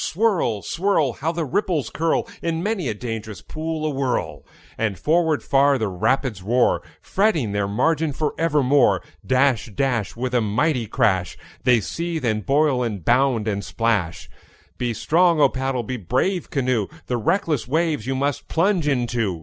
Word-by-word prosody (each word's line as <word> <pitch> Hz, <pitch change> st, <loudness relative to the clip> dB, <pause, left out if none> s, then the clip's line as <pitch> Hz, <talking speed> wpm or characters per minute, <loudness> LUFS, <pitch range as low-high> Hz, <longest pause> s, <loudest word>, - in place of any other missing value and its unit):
Swirl, 175 Hz, -, 0 dB
swirl! 165 Hz, -7 st, +1 dB
How 160 Hz, +7 st, -2 dB
the 165 Hz, -1 st, -2 dB
ripples 155 Hz, -, -1 dB
curl 165 Hz, +1 st, 0 dB
In 165 Hz, 0 st, -2 dB
many 205 Hz, -7 st, -1 dB
a 110 Hz, -, -2 dB
dangerous 110 Hz, -2 st, -6 dB
pool 160 Hz, 0 st, -4 dB
awhirl! 135 Hz, -4 st, -2 dB, 0.3 s
And 105 Hz, -4 st, -1 dB
forward 160 Hz, -, +1 dB
far 140 Hz, 0 st, +3 dB
the 110 Hz, -4 st, -1 dB
rapids 115 Hz, +3 st, 0 dB
roar, 120 Hz, +6 st, +2 dB, 0.2 s
Fretting 180 Hz, -, +1 dB
their 100 Hz, -1 st, 0 dB
margin 150 Hz, +9 st, +1 dB
for 150 Hz, +2 st, -2 dB
evermore. 140 Hz, -, +3 dB, 0.2 s
Dash, 130 Hz, -3 st, +2 dB
dash, 125 Hz, -7 st, -1 dB
With 125 Hz, +2 st, -3 dB
a 125 Hz, -, +3 dB
mighty 120 Hz, +3 st, 0 dB
crash, 100 Hz, -6 st, +1 dB, 0.3 s
They 125 Hz, -3 st, +5 dB
seethe, 165 Hz, -, -3 dB
and 110 Hz, -2 st, 0 dB
boil, 140 Hz, 0 st, +2 dB
and 105 Hz, -8 st, -3 dB
bound, 120 Hz, -3 st, +2 dB
and 100 Hz, -2 st, -1 dB
splash. 100 Hz, -6 st, -1 dB, 0.5 s
Be 120 Hz, -1 st, 0 dB
strong, 170 Hz, +3 st, +3 dB
O -, -, +6 dB
paddle! 130 Hz, -2 st, -2 dB
be 125 Hz, +3 st, -4 dB
brave, 130 Hz, -, -1 dB
canoe! 125 Hz, -6 st, 0 dB, 0.2 s
The 125 Hz, -, -1 dB
reckless 155 Hz, -, 0 dB
waves 155 Hz, -4 st, 0 dB
you 135 Hz, -, -1 dB
must 140 Hz, +1 st, -2 dB
plunge 175 Hz, -1 st, +1 dB
into. 120 Hz, -, 0 dB
130 Hz, 160 wpm, -22 LUFS, 115-160 Hz, 0.5 s, O